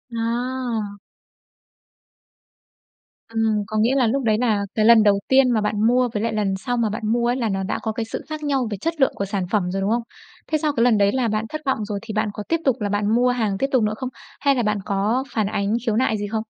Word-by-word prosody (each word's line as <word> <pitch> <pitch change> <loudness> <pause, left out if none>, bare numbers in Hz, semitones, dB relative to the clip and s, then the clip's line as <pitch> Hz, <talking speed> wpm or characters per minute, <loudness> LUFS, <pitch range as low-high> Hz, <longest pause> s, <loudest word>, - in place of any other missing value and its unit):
À. 230 -2 -2 2.4
Ừm, 220 -2 +1
có 215 - -3
nghĩa 235 +5 +3
là 255 -4 +3
lúc 270 +4 0
đấy 215 -2 +2
là 215 -4 +1
cái 215 - +2
lần 225 -1 +7
đầu 200 -1 +4
tiên 265 -1 +4
mà 220 - +2
bạn 210 +1 +1
mua 250 0 +3
với 210 +1 -1
lại 230 - -1
lần 205 -3 0
sau 245 +5 -3
mà 230 -2 +1
bạn 210 - -4
mua 235 0 +1
ấy 245 - +1
là 235 -4 -1
nó 195 -1 -1
đã 190 - -2
có 220 - -2
cái 225 +1 -3
sự 225 - -5
khác 310 0 -5
nhau 270 -5 0
về 205 - -3
chất 325 - -3
lượng 265 - +4
của 200 - -2
sản 200 -1 -2
phẩm 185 -5 +1
rồi, 195 +1 -2
đúng 195 - 0
không? 235 0 +1 0.5
Thế 310 - +3
sau 300 -1 -1
cái 230 - +1
lần 240 -3 +4
đấy 200 0 +3
là 255 -1 0
bạn 215 0 -1
thất 310 - -5
vọng 220 -6 0
rồi 205 -1 -4
thì 225 -1 -7
bạn 215 0 0
có 210 - -6
tiếp 330 0 +2
tục 265 - +3
là 205 - -1
bạn 205 +2 +1
mua 250 +1 +3
hàng 220 -5 0
tiếp 270 - 0
tục 255 -4 +3
nữa 210 0 0
không? 255 +1 -4 0.3
Hay 280 -1 +3
là 245 - 0
bạn 210 -1 +1
có 215 +5 0
phản 215 -3 +1
ánh 200 +1 -1
khiếu 220 -3 +1
nại 225 -3 +1
gì 205 0 -3
không? 220 +1 -2
225 Hz, 265 wpm, -22 LUFS, 210-250 Hz, 2.4 s, lần